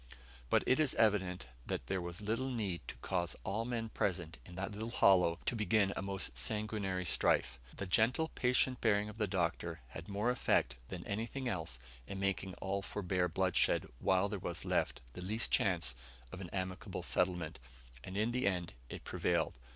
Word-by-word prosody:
But - - +4
it 130 - +4
is 155 -4 +4
evident 95 -5 +2 0.2
that - - -3
there 95 +8 -1
was 85 +1 -5
little 115 +6 0
needed 100 - -2
to - - -6
cause 85 -2 0
all 105 +4 -1
men 115 -2 -2
present 90 -6 -1
in 90 - -10
that 95 +3 -3
little 110 +3 -4
hollow 90 -7 +5
to - - +1
begin 105 -1 +3
a - - -2
most 95 -9 -1
sanguinary 100 - -1
strife. - - +3 0.2
The 100 - -3
gentle, 125 - +3
patient 125 0 +1
bearing 105 -2 +3
of 105 +2 -9
the 105 - +2
Doctor 85 -3 -1
had 80 +6 -8
more 105 +5 +1
effect 60 - +2
than - - -6
anything 115 +6 -3
else 80 - -2 0.3
in 95 - -5
making 95 -1 -1
all 100 +1 -2
forbear 90 -2 0
bloodshed, 90 +2 +2
while 95 +1 +3
there 100 -1 -3
was 85 -1 -3
left - - 0
the - - -7
least 110 +5 -1
chance 90 -8 +2 0.4
of 90 - -7
an 90 - -6
amicable 95 -1 -4
settlement, 90 -3 0 0.4
and 95 +1 -6
in 110 +3 +2
the 125 -3 +1
end 90 -3 0 0.2
it - - -7
prevailed. - - 0
95 Hz, 180 wpm, -35 LUFS, 90-110 Hz, 0.4 s, hollow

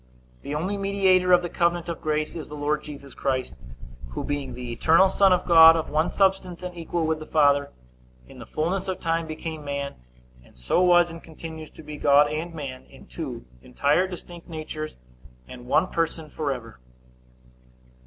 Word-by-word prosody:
The 145 - -5
only 185 +7 -2
mediator 190 -2 +2
of 180 0 +6
the - - -1
covenant 170 0 0
of 170 -2 -5
grace 155 0 -1
is 160 - -6
the 150 - -7
Lord 150 +1 -1
Jesus 140 -2 -10
Christ, 130 -2 -2 0.6
who, - - -4
being 145 -2 -3
the 125 -1 -6
eternal 165 +10 +4
Son 195 0 +4
of 180 - +2
God, 165 -1 +9
of 160 - -3
one 155 +3 +1
substance 190 -2 0
and 180 -1 -6
equal 170 0 -2
with 160 0 0
the 155 - -8
Father, 145 -2 +3 0.6
in - - -14
the - - -10
fullness 180 +5 -2
of 185 - -3
time 165 -1 -1
became 155 0 -6
man, 140 -1 -4 0.5
and 60 - -22
so 60 - +1
was 175 -1 +5
and 165 0 -9
continues 160 -1 -9
to 160 - -13
be 150 0 -8
God 145 +1 +4
and 160 +3 -3
man, 135 -5 -7
in - - -16
two - - -7 0.2
entire 145 - +1
distinct 175 -2 -10
natures, 155 -1 -6 0.5
and 125 -1 -11
one 130 - +3
person, 165 -3 -3
forever. 125 - -4
160 Hz, 180 wpm, -25 LUFS, 145-175 Hz, 0.6 s, God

